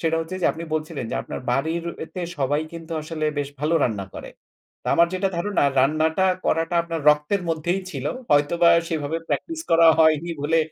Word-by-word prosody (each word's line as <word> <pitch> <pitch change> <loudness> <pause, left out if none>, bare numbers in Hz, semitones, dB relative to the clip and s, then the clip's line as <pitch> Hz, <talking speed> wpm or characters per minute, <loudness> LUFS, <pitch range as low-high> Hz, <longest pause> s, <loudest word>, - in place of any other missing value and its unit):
সেটা 165 -1 +1
হচ্ছে 165 +3 -5
যে - - +4
আপনি 165 +1 -7
বলছিলেন 155 -3 -3
যে - - -3
আপনার - - -6
বাড়ির 160 +6 -1 0.3
তে 180 - -4 0.2
সবাই 145 +2 +1
কিন্তু 165 0 -8
আসলে 155 0 -4
বেশ 145 -1 -2
ভালো 155 +3 +1
রান্না 105 -5 -1
করে। - - -8 0.5
তো - - -15
আমার 170 - +5
যেটা 190 +1 0
ধারণা, 195 +1 0 0.2
রান্নাটা 155 +6 +2 0.2
করাটা 165 +2 0
আপনার 165 -1 -4
রক্তের 150 +7 0
মধ্যেই 165 +4 -1
ছিল। 135 -3 -6 0.3
হয়তোবা 150 +4 +4 0.2
সেভাবে 160 0 -2
প্র্যাকটিস 330 -1 -2
করা 165 0 +6
হয়নি 160 +1 +3
বলে 160 +3 +2
160 Hz, 180 wpm, -23 LUFS, 150-170 Hz, 0.5 s, করা